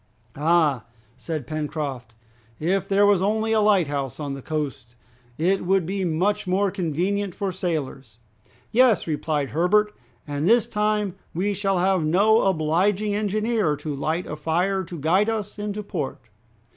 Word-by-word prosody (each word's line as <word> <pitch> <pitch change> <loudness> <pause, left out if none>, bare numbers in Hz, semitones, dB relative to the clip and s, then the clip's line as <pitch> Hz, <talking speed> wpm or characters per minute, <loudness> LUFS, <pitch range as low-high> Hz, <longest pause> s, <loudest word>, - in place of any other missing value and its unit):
"Ah!" 150 -5 +2 0.3
said 150 +2 -5
Pencroft, 145 -6 -4 0.4
"if 185 +5 0
there 200 +1 +4
was 200 -3 +4
only 220 +3 0
a 220 -1 +3
lighthouse 150 - +1
on 145 -2 -3
the 135 - -7
coast, 135 -5 -4 0.4
it 185 +4 +1
would 190 -1 +2
be 195 +2 -2
much 180 +4 0
more 195 +2 +1
convenient 185 +2 -1
for 195 -2 -2
sailors." 145 - -4 0.5
"Yes," 245 -3 +4
replied 150 -2 -1
Herbert, 210 +6 +2 0.3
"and 145 +4 -1
this 235 0 +5
time 210 -2 0 0.2
we 200 +4 0
shall 195 -1 0
have 185 -1 +2
no 205 +8 +4
obliging 190 +4 +1
engineer 210 -4 0
to 150 +1 -5
light 160 +5 -2
a - - -5
fire 175 +5 0
to 175 0 -8
guide 180 +8 +2
us 210 -2 -4
into 210 0 -4
port!" 165 -9 -4
180 Hz, 145 wpm, -24 LUFS, 155-205 Hz, 0.5 s, this